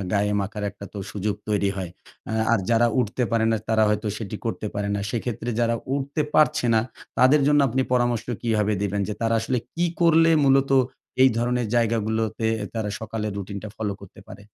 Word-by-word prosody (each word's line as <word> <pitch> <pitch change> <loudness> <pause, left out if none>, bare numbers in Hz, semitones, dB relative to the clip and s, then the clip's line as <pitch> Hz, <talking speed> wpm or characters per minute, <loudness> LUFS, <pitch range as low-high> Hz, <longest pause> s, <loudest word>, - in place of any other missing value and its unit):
গায়ে 105 0 +1
মাখার 105 +1 -4
একটাতো 100 +1 -10
সুযোগ 105 0 -1
তৈরি 100 -1 +1
হয়। 95 -3 -4 0.4
আ - - -3 0.2
আর 115 - +4
যারা 115 +1 +4
উঠতে 125 +2 -1
পারে 115 -1 +2
না 110 - +2
তারা 110 -1 +3
হয়তো 105 +1 0
সেটি 105 -1 -5
করতে 110 - -3
পারে 100 0 -2
না। 100 - -1
সেক্ষেত্রে 120 0 -3
যারা 115 0 +2 0.2
উঠতে 140 +2 -1
পারছে 155 -5 +3
না 110 - +5 0.4
তাদের 135 +4 +6
জন্য 145 -1 +5
আপনি 130 +3 +1
পরামর্শ 120 -2 +1 0.2
কীভাবে 110 -2 +1
দিবেন? 100 0 -1
যে 105 - -2
তারা 115 0 +2
আসলে 125 +2 -1 0.2
কী 175 +1 +2
করলে 165 -1 +5
মূলত 135 0 +4 0.5
এই 130 - +8
ধরনের 120 0 0
জায়গাগুলোতে 110 -1 0 0.3
তারা 110 -2 -2
সকালের 110 -1 -4
রুটিনটা 100 +2 -6
ফলো 105 -2 -2
করতে 95 -1 -13
পারে? - - -11
110 Hz, 180 wpm, -24 LUFS, 105-125 Hz, 0.5 s, এই